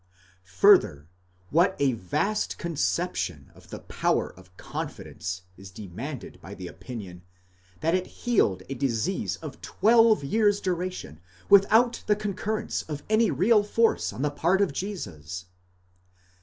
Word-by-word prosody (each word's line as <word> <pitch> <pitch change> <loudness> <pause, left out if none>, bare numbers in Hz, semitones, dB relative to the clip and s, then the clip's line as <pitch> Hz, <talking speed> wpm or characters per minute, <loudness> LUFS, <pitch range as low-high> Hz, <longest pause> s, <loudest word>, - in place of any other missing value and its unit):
Fur 90 - +8
ther, 75 +1 -10 0.4
what 175 +5 +3
a 140 -2 +2
vast 115 - -1
conception 170 -4 -2
of - - -19
the - - -6
power - - -1
of 90 0 -19
confidence 90 +1 -6
is 95 0 -11
demanded 110 - -8
by - - -9
the - - -8
opinion, 100 -8 -8 0.6
that 165 +1 +1
it 185 0 0 0.2
healed 100 - +2
a 135 - -4
disease 135 - -1
of 150 -4 -8
twelve 225 -2 +4
years' 205 +6 +2
duration 180 - -4 0.3
without 220 +5 +5
the 210 - +4
concur 210 +1 -3
rence - - -3
of 150 -1 -5
any 220 0 +4
real 205 - +4
force 225 +2 +1
on 110 +7 -5
the 150 - +1
part 170 +6 +1
of 200 -7 +1
Jesus! 90 - -6
160 Hz, 140 wpm, -26 LUFS, -, 0.6 s, Fur